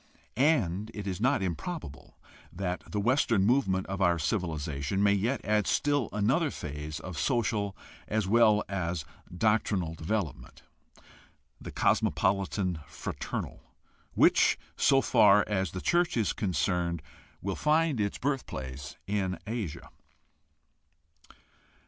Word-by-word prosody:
And 110 - +2
it 105 -1 -5
is 95 0 -4
not 130 -4 +2
improbable 85 - -5 0.3
that 90 -1 -3
the 105 - -1
Western 115 -3 +2
movement 100 -6 +2
of 95 0 -4
our 85 -2 +4
civilization 80 0 -1
may 100 -1 +5
yet 115 +7 -1
add 105 0 +2
still 145 -4 +1
another 135 +10 +1
phase 75 - -6
of 90 +1 -6
social 105 -5 0 0.3
as 110 -1 0
well 110 -1 +5
as 85 -5 -3 0.3
doctrinal 100 -3 +1
development 80 - -4 0.5
— - - -29
the - - -7
cosmopolitan 95 -2 +1
fraternal, - - -5 0.5
which, - - +5 0.2
so 135 -1 +4
far 105 -4 +5
as 95 -3 0
the 95 +4 -6
church 175 -4 +2
is 110 -4 +1
concerned, 90 -4 -1 0.4
will 95 0 -3
find 155 -3 +2
its 100 -1 -1
birthplace 70 - -4
in 95 -2 -1
Asia. 110 -8 -5
100 Hz, 120 wpm, -29 LUFS, 90-115 Hz, 0.5 s, may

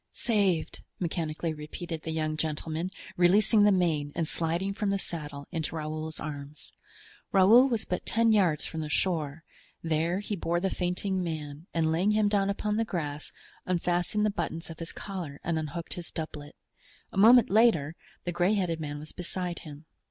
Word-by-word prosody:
"Saved!" 200 -8 +1 0.2
mechanically 165 -2 -2
repeated 155 +2 -6
the 160 - -6
young 155 -1 -1
gentleman, 155 +2 -2 0.3
releasing 205 +4 +5
the 210 - +6
mane 160 -6 +1
and 165 -2 0
sliding 170 +5 0
from 205 0 -1
the 200 - +2
saddle 150 -6 -6
into 165 -2 -3
Raoul's 155 0 -4
arms; 145 0 -7 0.6
Raoul 220 +8 +7
was 230 -3 -1
but 180 - -2
ten 230 0 +3
yards 180 -8 +3
from 160 - -4
the 155 - -4
shore; 160 -2 -1 0.4
there 165 +2 +1
he 205 +1 -3
bore 170 -1 0
the 190 +2 -1
fainting 185 +1 -1
man, 155 -1 -5
and 160 -1 +1
laying 185 +6 +2
him 210 -1 +3
down 200 -1 +2
upon 210 +1 -1
the 225 - +2
grass, 150 -8 -4 0.4
unfastened 180 +3 +1
the 210 - +2
buttons 165 -4 -4
of 160 - -10
his 165 - -5
collar 175 -8 -6
and 165 -1 0
unhooked 155 +2 -4
his 175 -1 -7
doublet. 150 -2 -6 0.6
A - - -6
moment 235 +2 +7
later 195 -9 +4 0.3
the 175 - -2
gray 180 +4 +2
headed 175 -5 0
man 145 -2 -4
was 150 +1 -8
beside 180 0 -4
him. 150 -2 -11
170 Hz, 175 wpm, -29 LUFS, 155-195 Hz, 0.6 s, Raoul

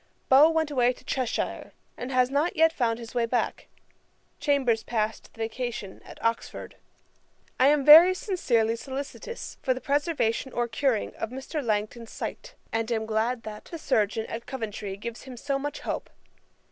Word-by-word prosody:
Beau 280 +4 +8
went 320 -2 0
away 250 -2 +3
to - - -18
Cheshire, 255 -4 -2 0.2
and 250 +2 -6
has 255 0 +3
not 295 +5 +1
yet 325 0 +4
found 230 -5 0
his 230 -1 -9
way 235 -2 +1
back. 245 +1 -1 0.7
Chambers 265 -6 +2
passed 220 -1 -2
the - - -25
vacation 225 -3 -4
at - - -12
Oxford. 230 0 -2 0.8
'I 260 - +6
am 290 -1 +3
very 335 +5 +10
sincerely 235 - +1
solicitous 275 - -7
for 260 -2 +1
the - - -5
preservation 280 -4 0
or 240 0 0
curing 235 -1 0
of 225 - -3
Mr. 265 +4 -5
Langton's 220 +1 -2
sight, - - -6 0.2
and 225 +1 -1
am 220 -1 0
glad 225 +2 0
that 215 -1 -8
the 335 - -7
chirurgeon 220 -6 0
at 230 +1 -7
Coventry 210 -6 -5
gives 235 +4 -7
him 255 -2 -9
so 275 +3 -1
much 290 +1 -4
hope. - - -4
245 Hz, 165 wpm, -27 LUFS, 225-280 Hz, 0.8 s, very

